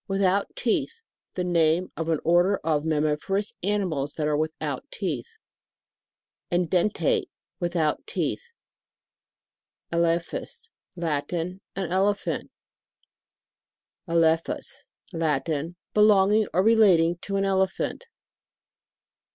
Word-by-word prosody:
Without 195 0 +1
teeth. 460 -2 -1 0.3
The 180 - -1
name 170 0 +2
of 165 0 -3
an 160 -2 +1
order 175 +4 +4
of 155 -2 +1
mammiferous 155 +6 0
animals 175 -8 -1
that 155 - -1
ara 150 0 +1
without 155 +1 -2
teeth. 465 -2 -4 1.1
EDENTATE. 180 +3 +1 0.3
Without 175 - -1
teeth. 475 +1 -2 1.4
ELEPHAS. 170 - -1 0.2
Latin. 170 +3 -2
An 190 -3 -3
Elephant. 195 +2 0 1.6
ELEPHUS. 165 -1 0 0.3
Latin. 160 0 -1 0.2
Belonging 210 0 +5
or 185 +3 +2
re 225 +2 +5
lating 175 -6 +4
to 195 - -4
an 195 0 +1
elephant. 190 - -1
175 Hz, 95 wpm, -26 LUFS, 165-195 Hz, 1.6 s, Belonging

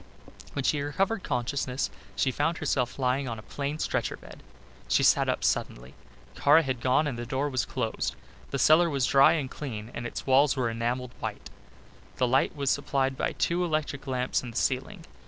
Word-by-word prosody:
When 140 - -2
she 145 +2 +1
recovered 195 +9 0
consciousness 130 -1 -2 0.2
she 135 - +1
found 155 +6 0
herself 125 -2 -1
lying 130 +1 0
on 115 - -4
a 110 - -10
plain 145 +4 -4
stretcher - - -1
bed. - - -13 0.5
She - - +3
sat - - +4
up - - -1
suddenly. 60 +2 -1 0.4
Kara 150 +3 +5
had 130 -4 -3
gone 130 +5 +3
and 130 -5 -3
the 120 - -4
door 135 +4 -1
was 130 -2 0
closed. 115 -4 -2 0.3
The - - -2
cellar 165 +2 +5
was 135 -4 +1
dry 135 +2 +6
and 150 -5 -1
clean 115 -6 -6
and 120 +1 -4
its - - -6
walls 135 +1 +4
were 120 -3 0
enamelled 120 +2 -2
white. - - -6 0.7
Light 130 +4 +2
was 140 -2 0
supplied 135 -2 0
by - - -1
two 175 +1 0
electric 155 -4 -2
lamps 125 -1 0
in 125 - -7
the 115 - -7
ceiling. 165 +7 -1
135 Hz, 185 wpm, -28 LUFS, 125-145 Hz, 0.7 s, dry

